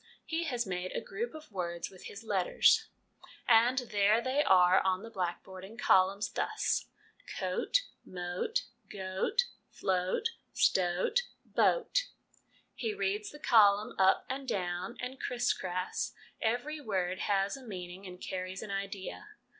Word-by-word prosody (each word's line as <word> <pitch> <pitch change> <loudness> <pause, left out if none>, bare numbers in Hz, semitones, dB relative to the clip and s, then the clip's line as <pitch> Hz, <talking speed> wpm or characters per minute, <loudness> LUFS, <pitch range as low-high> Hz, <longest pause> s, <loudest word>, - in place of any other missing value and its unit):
He 330 +1 -1
has 245 -5 -1
made 185 -1 -3
a - - -1
group 235 +7 -5
of 310 -4 -11
words 170 -3 -3
with 185 - -13
his 205 +2 -8
letters, 195 -5 +3 0.6
and 240 +2 +5
there 205 +2 +4
they 260 +4 +1
are 185 -6 +6
on 185 +1 0
the 230 - -9
black 180 -4 -2
board 190 -1 -10
in 195 +3 -9
a - - -14
column, 190 -2 +4
thus 430 0 0 0.4
c - - -4
oat 430 - +1 0.2
m 185 - -11
oat 180 - -1 0.3
g 205 - -9
oat 190 - +1 0.3
fl - - -2
oat 185 - +1 0.2
st 185 -2 +3
oat 460 - +2 0.3
b - - +4
oat - - +3 0.7
He 435 -2 -3
reads 410 +1 -1
the 295 - -11
column 210 -6 +5
up 190 0 +4
and 265 +1 -4
down 180 -2 -2
and 255 +1 -5
cris 245 0 +1
cras; 185 0 -3 0.3
every 245 +7 -1
word 185 -6 -1
has 195 -1 +1
a 270 - -10
meaning 190 -4 -7
and 180 0 -10
carries 185 0 -4
an 205 - -6
idea. 195 - -5
200 Hz, 160 wpm, -32 LUFS, 185-260 Hz, 0.7 s, are